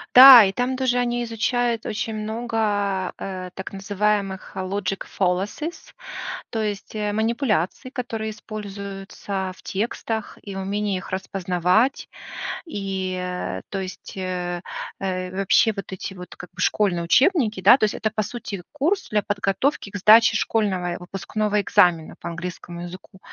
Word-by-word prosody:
Да. 255 -3 +12
И 190 - +2
там 250 +5 -1
тоже 255 -1 +1
они 240 0 0
изучают 235 0 0
очень 220 +1 -2
много, 215 -4 -1
э, 185 -1 -5
так 190 - -7
называемых 195 -1 -1
logic 190 0 -2
fallacies, 200 - -2 0.6
то 225 - -2
есть, 210 0 -4
э, 210 -1 -1
манипуляций, 220 - 0
которые 225 -4 -3
используются 200 -2 -6
в - - -18
текстах, 220 +1 -3
и 200 -1 -7
умении 200 +1 -1
их 185 - -7
распознавать, 185 +5 +1 0.6
и, 195 - -3
э, 180 0 -3
то 195 - -3
есть, 185 -1 -7
э, 180 -1 -3 0.4
э, 185 -1 -2
вообще 195 +3 +3
вот 195 - -6
эти 190 +1 -6
вот 180 -1 -10
как 175 - -10
бы 180 - -16
школьные 185 -5 +2
учебники, 235 - +3
да, 205 +7 +8
то - - -3
есть, 210 - +3
это, 215 - -1
по 215 0 -1
сути, 205 -4 -6
курс 330 +7 0
для 210 -1 +2
подготовки 200 +4 -1
к 205 - -4
сдаче 220 +3 +7
школьного 190 -7 0
и - - -5
выпускного 205 +3 -1
экзамена 170 -4 +3
по 170 - -5
английскому 170 0 -6
языку. 185 +2 -10
200 Hz, 145 wpm, -23 LUFS, 185-225 Hz, 0.6 s, Да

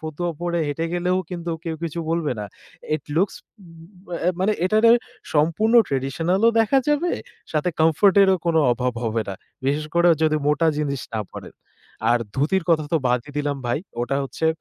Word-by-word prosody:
ফতুয়া 160 +2 -3
পড়ে 175 0 -1
হেঁটে 165 +3 -2
গেলেও 180 +1 +1
কিন্তু 170 -1 -4
কেউ 160 -1 -3
কিছু 170 0 -4
বলবে 165 -4 0
না। - - -4 0.5
ইট 145 - -15
লুকস 190 +4 +2 0.3
উব 175 +3 -16
অ্যা 175 - +2
মানে 200 +3 +2
এটারে 215 +4 +4 0.4
সম্পূর্ণ 170 +10 +2
ট্র্যাডিশনাল 140 +8 0
ও - - +5
দেখা 225 +5 +3
যাবে, 295 +4 +1 0.4
সাথে 155 +3 0
কমফোর্ট 165 +5 +4
এরও 190 -1 +4
কোন 170 - +2 0.2
অভাব 125 +1 -1
হবে 115 0 0
না। 95 - -3 0.3
বিশেষ 145 +2 0
করে 170 0 +5
যদি 155 -1 +3
মোটা 150 +2 +2
জিনিস 140 -3 -2
না 110 - 0
পড়েন। - - -10 0.6
আর 120 - +4 0.2
ধুতির 160 +7 +1
কথা 155 -2 +3
তো - - +5
বাদই 125 +3 -1
দিলাম 145 -1 -1
ভাই। 120 - 0 0.2
ওটা 135 +3 -1
হচ্ছে 160 +4 -3
165 Hz, 175 wpm, -22 LUFS, 145-180 Hz, 0.6 s, ও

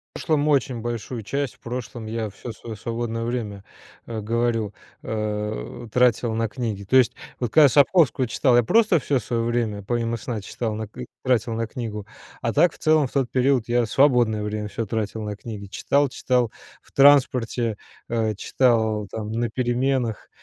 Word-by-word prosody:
В - - -5
прошлом 155 -3 +1
очень 130 -5 +1
большую 120 0 -4
часть, 140 +4 -2
в - - -30
прошлом 120 -2 -6
я 110 -2 -3
всё 120 - -8
своё 115 0 -8
свободное 115 +1 -3
время, 110 -5 -4 0.4
э, 110 -2 -4
говорю, 115 -1 0 0.3
э, 105 - -4
тратил 120 -2 +3
на 115 0 0
книги. 110 -6 -4
То 130 - -1
есть 125 - +4 0.3
вот 120 -3 -2
когда 155 - +7
я 140 - +6
Сапковского 145 -2 +4
читал, 120 +2 +2
я 120 - +5
просто 210 - +4
всё 135 0 0
своё 115 0 -2
время 115 -4 -1
помимо 115 +1 -1
сна 115 -2 -4
читал 110 +2 -4
на 110 0 -4
к 105 - -21
и 125 - -4 0.2
тратил 120 -3 +1
на 115 0 -2
книгу. 110 -4 -6 0.3
А 115 - 0
так, 175 +9 +4
в - - -17
целом, 155 -2 +4
в - - -18
тот 135 -3 +1
период 130 -2 +2
я 120 0 +2
свободное 120 -4 +3
время 105 0 -3
всё 110 +2 -4
тратил 110 0 -2
на 105 -1 -4
книги, 105 -2 -8
читал 140 +7 +1
читал 125 -3 0 0.3
в - - -24
транспорте, 125 -5 +4 0.3
э, 110 -2 0
читал 110 -3 +1
там 110 -1 -5
на 115 +1 -1
переменах, 125 -1 -1
115 Hz, 180 wpm, -23 LUFS, 110-125 Hz, 0.4 s, когда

